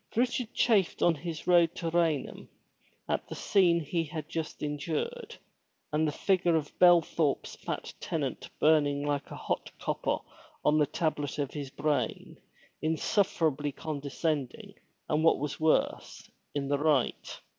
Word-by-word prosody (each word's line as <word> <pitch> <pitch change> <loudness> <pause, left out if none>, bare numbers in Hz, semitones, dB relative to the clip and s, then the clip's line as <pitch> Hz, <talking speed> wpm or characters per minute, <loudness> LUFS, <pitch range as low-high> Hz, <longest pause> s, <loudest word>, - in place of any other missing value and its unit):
Richard 245 0 0
chafed 205 -7 +2
on 175 - +5
his 160 +1 -6
road 170 -2 +4
to 165 -2 -3
Raynham 165 -4 0 0.6
at - - -1
the - - -6
scene 175 -4 +3
he 165 +2 -1
had 155 0 -6
just 160 -2 -5
endured, 165 - -3 0.6
and 155 +1 +2
the - - 0
figure 175 +1 +2
of 150 -2 -2
Belthorpe's 170 -4 +3
fat - - -5
tenant - - -3
burnt 145 -2 +3
like 145 -1 -1
hot - - -4
copper - - -1 0.5
on 150 +1 +4
the 150 - +3
tablet 150 -3 -2
of 140 -2 -2
his 145 -3 -5
brain, 150 +1 -2 0.4
insufferably 155 -3 +1
condescending 145 -1 -3 0.3
and 155 +1 +1
what 165 - +5
was 145 0 -4
worse, 155 0 0 0.2
in 140 -1 -1
the 140 0 +1
right. 145 -4 0
155 Hz, 135 wpm, -30 LUFS, 145-170 Hz, 0.6 s, on